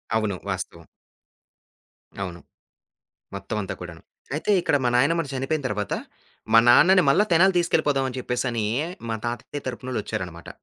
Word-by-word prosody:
అవును. 105 Hz, -4 st, 0 dB
వాస్తవం. 95 Hz, -3 st, -5 dB, 1.3 s
అవును. 90 Hz, -3 st, -5 dB, 1.0 s
మొత్తం 100 Hz, +2 st, -5 dB
అంతా 95 Hz, -, -5 dB
కూడాను. 85 Hz, -2 st, -9 dB, 0.3 s
అయితే 160 Hz, -, -2 dB
ఇక్కడ 145 Hz, -, +2 dB
మా -, -, +3 dB
నాయన్నమ్మ 165 Hz, +6 st, +2 dB
చనిపోయిన 135 Hz, +4 st, -1 dB
తర్వాత 105 Hz, -2 st, -2 dB, 0.6 s
మా 115 Hz, -, +8 dB
నాన్నని 185 Hz, +10 st, +7 dB
మళ్ళా 140 Hz, +10 st, +5 dB
తెనాలి 185 Hz, +3 st, +5 dB
తీసుకెళ్ళిపోదాం 150 Hz, -5 st, +1 dB
అని 130 Hz, 0 st, -6 dB
చెప్పేసిని 120 Hz, -2 st, -2 dB, 0.4 s
మా 110 Hz, -, -1 dB
తాతయ్య 120 Hz, +4 st, -5 dB
తరపునోళ్ళొచ్చారనమాట. 110 Hz, -9 st, -5 dB
125 Hz, 125 wpm, -24 LUFS, 100-145 Hz, 1.3 s, మా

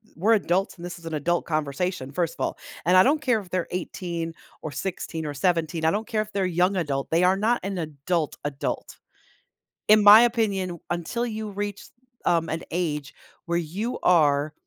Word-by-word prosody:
we're 210 Hz, +7 st, +3 dB
adults, 195 Hz, -2 st, +1 dB
and 175 Hz, 0 st, -9 dB
this 175 Hz, -, -7 dB
is 165 Hz, -, -10 dB
an 160 Hz, -, -3 dB
adult 175 Hz, +4 st, 0 dB
conversation, 155 Hz, -1 st, -2 dB
first 165 Hz, +2 st, -1 dB
of -, -, 0 dB
all, -, -, -3 dB, 0.3 s
and 180 Hz, +2 st, +4 dB
I 185 Hz, -, +9 dB
don't 295 Hz, +7 st, +3 dB
care 245 Hz, -6 st, +2 dB
if 190 Hz, -, -11 dB
they're 180 Hz, -1 st, -1 dB
18 170 Hz, -2 st, -4 dB, 0.3 s
or 155 Hz, -, -5 dB
16 160 Hz, +1 st, -4 dB
or 145 Hz, -, -3 dB
17, 165 Hz, +1 st, 0 dB
I 160 Hz, -, +4 dB
don't 210 Hz, +3 st, -2 dB
care 215 Hz, -2 st, 0 dB
if 215 Hz, 0 st, -7 dB
they're 195 Hz, -2 st, 0 dB
young 180 Hz, +2 st, +2 dB
adult, 145 Hz, -6 st, -2 dB
they 170 Hz, +2 st, +2 dB
are 185 Hz, +1 st, +5 dB
not 230 Hz, +4 st, +2 dB
an 195 Hz, -1 st, -3 dB
adult-adult. 150 Hz, -1 st, -3 dB, 0.9 s
In 215 Hz, 0 st, +6 dB
my 210 Hz, +2 st, +10 dB
opinion 220 Hz, -6 st, +1 dB
w 170 Hz, -2 st, -8 dB
until 175 Hz, +8 st, -2 dB
you 220 Hz, -2 st, -4 dB
reach, 205 Hz, 0 st, -5 dB, 0.4 s
um, 165 Hz, -1 st, +2 dB
an 160 Hz, +1 st, -2 dB
age 150 Hz, -5 st, -2 dB, 0.3 s
where 170 Hz, 0 st, 0 dB
you 195 Hz, +9 st, -3 dB
are, 150 Hz, -4 st, +3 dB
175 Hz, 190 wpm, -25 LUFS, 160-200 Hz, 0.9 s, my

